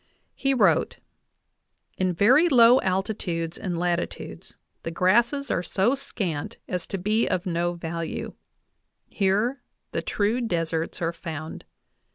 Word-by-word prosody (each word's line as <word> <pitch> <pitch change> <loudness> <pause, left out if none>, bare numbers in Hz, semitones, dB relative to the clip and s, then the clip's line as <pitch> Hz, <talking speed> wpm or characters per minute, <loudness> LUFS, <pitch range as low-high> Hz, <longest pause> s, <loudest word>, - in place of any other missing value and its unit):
He 275 0 0
wrote: - - +3 1.0
"In 185 -1 +1
very 255 - +5
low 245 -2 +7
altitudes 185 -3 -2
and 180 -5 -4
latitudes 175 0 -3 0.3
the - - -4
grasses 235 - +2
are - - +1
so 195 +7 +1
scant 180 - -4
as 180 -2 -3
to 195 - -3
be 215 +5 +1
of 185 +1 -1
no 175 -1 0
value; 165 -1 -5 0.8
here 210 +7 +1 0.3
the - - -2
true 220 +4 0
deserts 165 -6 -2
are 165 +1 0
found. 160 -2 -7
185 Hz, 125 wpm, -25 LUFS, 170-230 Hz, 1.0 s, low